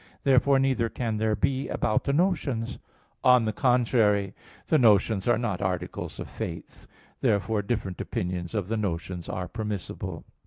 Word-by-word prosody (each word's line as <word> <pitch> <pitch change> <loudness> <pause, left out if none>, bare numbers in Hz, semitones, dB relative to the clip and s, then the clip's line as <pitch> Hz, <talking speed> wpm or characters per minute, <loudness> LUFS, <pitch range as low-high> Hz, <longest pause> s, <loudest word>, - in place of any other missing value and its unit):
Therefore 135 +1 +4
neither 130 -4 +1
can 115 -3 -2
there 110 0 +1
be 130 +6 0
about 110 - 0
the 140 - +1
notions. 140 -8 0 0.4
On 125 -2 +6
the 110 - -1
contrary, 110 -6 +2 0.3
The 155 - +3
notions 105 -3 +4
are 120 - +4
not 105 -5 -2
articles 90 -1 -3
of - - -5
faith. - - -7 0.3
Therefore 110 -2 +1
different 100 -3 -3
opinions 90 +1 -3
of 100 -4 -1
the 115 +2 -1
notions 90 -3 -3
are 90 0 -3
permissible. 105 -4 -5
110 Hz, 150 wpm, -27 LUFS, 100-125 Hz, 0.4 s, On